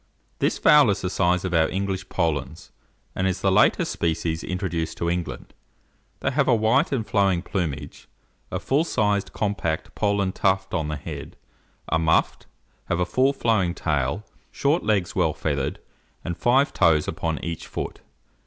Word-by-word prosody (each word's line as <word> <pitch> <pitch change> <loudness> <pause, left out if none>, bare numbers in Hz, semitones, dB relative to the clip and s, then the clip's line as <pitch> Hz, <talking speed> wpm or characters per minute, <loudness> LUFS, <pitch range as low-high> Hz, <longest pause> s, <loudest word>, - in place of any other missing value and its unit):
This - - +1
fowl 150 -5 +6
is 100 - 0
the 90 - -2
size 90 -1 +1
of 90 - -3
our 80 -1 +3
English 95 -1 -3
Polands, 80 -4 -2 0.4
and 95 - 0
is 95 - -2
the - - +2
latest - - +3
species 80 0 -1
introduced 90 -3 -3
to 85 0 0
England. 90 -1 -4 0.7
They - - 0
have 140 0 +1
a 125 - +5
white 115 - +2
and 125 -6 -1
flowing 95 -5 +1
plumage, 80 -9 -4 0.4
a - - -3
full 140 +4 +1
sized, 105 - 0
compact 100 -7 -2
Poland 100 -2 0
tuft 95 0 0
on 80 -1 -1
the 75 - -2
head, 70 - -8 0.5
are 80 - +2
muffed, 80 0 +1 0.4
have 85 - -1
a 90 - +2
full 130 +10 +2
flowing 110 -10 +1
tail, 75 +5 -1 0.3
short 145 +5 +1
legs 105 -4 0
well - - +2
feathered, 70 -3 -2 0.5
and 85 - -2
five 130 +8 +2
toes 75 -2 +3
upon 80 -2 -2
each 85 -1 -5
foot. - - -5
95 Hz, 160 wpm, -24 LUFS, 80-105 Hz, 0.7 s, fowl